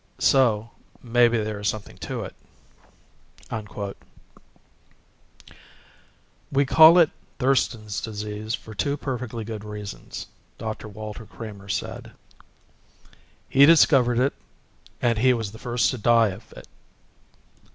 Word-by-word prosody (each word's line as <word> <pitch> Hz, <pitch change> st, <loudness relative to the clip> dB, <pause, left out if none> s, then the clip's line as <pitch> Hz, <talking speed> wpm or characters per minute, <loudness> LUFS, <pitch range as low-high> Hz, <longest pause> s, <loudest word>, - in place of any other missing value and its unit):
So 115 Hz, -5 st, +3 dB, 0.3 s
maybe 120 Hz, -1 st, +3 dB
there 105 Hz, -1 st, -3 dB
is 105 Hz, -, -2 dB
something 110 Hz, -1 st, -4 dB
to -, -, -4 dB
it -, -, -8 dB, 1.2 s
_ 105 Hz, -2 st, -5 dB, 2.6 s
"We 140 Hz, 0 st, +2 dB
call 160 Hz, +5 st, +8 dB
it 170 Hz, -3 st, +5 dB, 0.3 s
Thurston's 120 Hz, -5 st, 0 dB
Disease 105 Hz, 0 st, -4 dB
for 110 Hz, -, -12 dB
two 140 Hz, +8 st, -1 dB
perfectly 125 Hz, -5 st, -4 dB
good 110 Hz, -1 st, -6 dB
reasons," 105 Hz, -1 st, -7 dB, 0.3 s
Dr. 110 Hz, 0 st, -5 dB
Walter 105 Hz, +1 st, -8 dB
Kramer 100 Hz, -3 st, -10 dB
said. -, -, -4 dB, 1.3 s
"He 140 Hz, +1 st, +6 dB
discovered 135 Hz, -7 st, +5 dB
it 130 Hz, +3 st, +2 dB, 0.7 s
and 115 Hz, -2 st, +2 dB
he 130 Hz, +1 st, +4 dB
was 110 Hz, -4 st, -4 dB
the 110 Hz, -, -12 dB
first 120 Hz, -1 st, +1 dB
to 130 Hz, -, -5 dB
die 115 Hz, 0 st, +4 dB
of 105 Hz, +4 st, -10 dB
it." -, -, -12 dB
115 Hz, 115 wpm, -24 LUFS, 105-125 Hz, 2.6 s, call